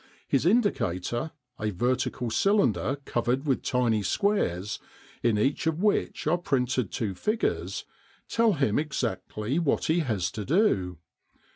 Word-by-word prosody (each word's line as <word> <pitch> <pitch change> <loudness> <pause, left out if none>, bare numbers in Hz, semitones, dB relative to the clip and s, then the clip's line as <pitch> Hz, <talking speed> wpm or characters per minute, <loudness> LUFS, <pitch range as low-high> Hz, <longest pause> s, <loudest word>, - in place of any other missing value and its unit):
His 140 +4 +2
indicator, 120 - +1 0.3
a 105 - -1
vertical 120 +3 -1
cylinder 135 - +2
covered 120 +4 0
with 135 -3 +1
tiny 120 -4 +1
squares, 105 - 0 0.4
in 115 -3 +2
each 135 +8 +1
of 160 0 0
which 210 - +1
are 170 +4 +2
printed 130 - 0
two 110 -6 -2
figures, 215 - -1 0.4
tell 230 -2 +3
him 135 - +1
exactly 130 -3 -2
what 165 -5 +1
he 160 +2 +2
has 110 - -1
to 105 - -5
do. 100 - +2
130 Hz, 130 wpm, -27 LUFS, 105-160 Hz, 0.4 s, tell